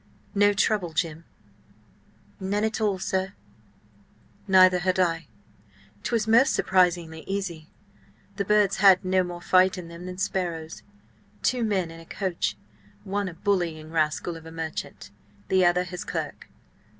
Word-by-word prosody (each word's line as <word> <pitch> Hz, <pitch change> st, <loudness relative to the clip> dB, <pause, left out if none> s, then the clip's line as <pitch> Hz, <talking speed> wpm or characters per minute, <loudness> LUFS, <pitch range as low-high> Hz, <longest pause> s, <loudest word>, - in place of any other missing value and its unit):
"No 205 Hz, 0 st, +4 dB
trouble, 195 Hz, -3 st, 0 dB
Jim?" 160 Hz, 0 st, -2 dB, 1.1 s
"None 200 Hz, +2 st, -1 dB
at 220 Hz, 0 st, -1 dB
all, 205 Hz, -3 st, +1 dB
sir." 190 Hz, +1 st, -2 dB, 1.1 s
"Neither 185 Hz, -1 st, +6 dB
had 185 Hz, +1 st, 0 dB
I. 165 Hz, -4 st, +1 dB, 0.7 s
'Twas 225 Hz, -2 st, -1 dB
most 235 Hz, +6 st, +5 dB
surprisingly 175 Hz, -3 st, +1 dB
easy. 185 Hz, -5 st, -4 dB, 0.7 s
The 200 Hz, -, -1 dB
birds 210 Hz, -1 st, +3 dB
had 190 Hz, -1 st, +6 dB
no 185 Hz, 0 st, +3 dB
more 175 Hz, -1 st, -7 dB
fight 185 Hz, +1 st, +4 dB
in 175 Hz, -2 st, -8 dB
them 170 Hz, +2 st, -9 dB
than 180 Hz, 0 st, -7 dB
sparrows. 170 Hz, -, -3 dB, 0.6 s
Two 250 Hz, -2 st, +1 dB
men 190 Hz, -6 st, 0 dB
in 165 Hz, -, -11 dB
a 165 Hz, -, -13 dB
coach–one 110 Hz, -, -4 dB
a 170 Hz, -, -11 dB
bullying 165 Hz, -5 st, -1 dB
rascal 160 Hz, +1 st, 0 dB
of 165 Hz, 0 st, -11 dB
a -, -, -10 dB
merchant, 160 Hz, -9 st, -6 dB, 0.4 s
the 190 Hz, -1 st, +4 dB
other 175 Hz, 0 st, +3 dB
his 180 Hz, -1 st, -6 dB
clerk. -, -, -5 dB
185 Hz, 140 wpm, -26 LUFS, 165-195 Hz, 1.1 s, Neither